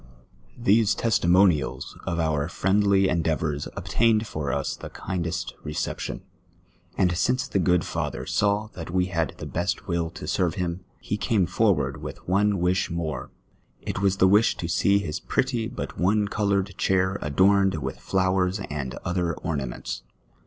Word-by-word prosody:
These 115 Hz, -2 st, +3 dB
testimonials 90 Hz, -, +2 dB
of 85 Hz, -, -1 dB
om* 75 Hz, -3 st, 0 dB
friendly 100 Hz, 0 st, +3 dB
endeavours 80 Hz, -4 st, 0 dB
obtained 115 Hz, -1 st, +2 dB
for 75 Hz, -9 st, -3 dB
us 70 Hz, +2 st, -1 dB
the -, -, -9 dB
kindest 90 Hz, 0 st, -3 dB
recejition; 75 Hz, 0 st, -3 dB, 0.8 s
and 90 Hz, -1 st, +2 dB
since 125 Hz, +8 st, +1 dB
the 100 Hz, -, 0 dB
good 90 Hz, -1 st, +3 dB
father -, -, -3 dB
saw 105 Hz, +1 st, +1 dB
that 80 Hz, -2 st, -7 dB
we 90 Hz, +1 st, +1 dB
had 85 Hz, -4 st, 0 dB
the -, -, -7 dB
best 90 Hz, +3 st, -2 dB
will 85 Hz, -2 st, 0 dB
to 85 Hz, -, -10 dB
sci'\e 90 Hz, -5 st, 0 dB
him, 90 Hz, 0 st, -2 dB, 0.2 s
he 105 Hz, -, -3 dB
came 105 Hz, -3 st, +2 dB
forward -, -, +1 dB
with -, -, -8 dB
one 100 Hz, +3 st, +3 dB
^vish 90 Hz, 0 st, +1 dB
more; 85 Hz, -2 st, -3 dB, 0.5 s
it -, -, -3 dB
was 100 Hz, -1 st, +2 dB
the 95 Hz, -, +5 dB
wish 105 Hz, +4 st, +4 dB
to 85 Hz, -, -3 dB
see 100 Hz, +4 st, +3 dB
his 85 Hz, -7 st, -3 dB
})retty 125 Hz, -4 st, 0 dB
but -, -, -6 dB
one 105 Hz, +3 st, +2 dB
coloured 100 Hz, -2 st, 0 dB
chair 95 Hz, +1 st, +1 dB
adorned 95 Hz, +5 st, +3 dB
with 70 Hz, -4 st, -4 dB
flowers 95 Hz, 0 st, +1 dB
and 70 Hz, -4 st, -4 dB
other 90 Hz, -1 st, 0 dB
ornaments. 70 Hz, -7 st, -4 dB
90 Hz, 150 wpm, -25 LUFS, 85-100 Hz, 0.8 s, the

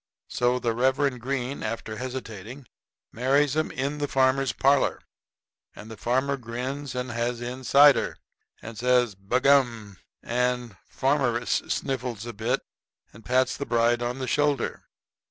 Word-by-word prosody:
So 125 Hz, +1 st, +1 dB
the 120 Hz, -2 st, -1 dB
Reverend 130 Hz, +1 st, +1 dB
Green, 135 Hz, +1 st, -3 dB
after 110 Hz, 0 st, -4 dB
hesitating, 125 Hz, 0 st, -7 dB, 0.5 s
marries 135 Hz, +4 st, +2 dB
'em 155 Hz, 0 st, 0 dB
in 140 Hz, +3 st, -3 dB
the 145 Hz, -, -1 dB
farmer's 135 Hz, 0 st, +2 dB
parlor. 140 Hz, +1 st, +2 dB, 0.8 s
And 110 Hz, 0 st, -10 dB
farmer 130 Hz, +3 st, 0 dB
grins, 130 Hz, +3 st, -5 dB
and 125 Hz, 0 st, -3 dB
has 120 Hz, +1 st, -2 dB
in 125 Hz, +2 st, -6 dB
cider, 140 Hz, +1 st, +5 dB, 0.5 s
and 115 Hz, +1 st, -8 dB
says 125 Hz, -1 st, +2 dB
"B'gum!" 115 Hz, 0 st, +1 dB, 0.3 s
and 125 Hz, -2 st, -1 dB
farmeress 130 Hz, -3 st, +1 dB
sniffles 125 Hz, -5 st, -3 dB
a 120 Hz, -, -6 dB
bit 110 Hz, +4 st, -1 dB, 0.5 s
and 110 Hz, -, -15 dB
pats 125 Hz, +4 st, +1 dB
the 140 Hz, -, -4 dB
bride 120 Hz, 0 st, +2 dB
on 120 Hz, +1 st, -2 dB
the 130 Hz, -, -3 dB
shoulder. 145 Hz, -2 st, 0 dB
125 Hz, 135 wpm, -26 LUFS, 120-135 Hz, 0.8 s, cider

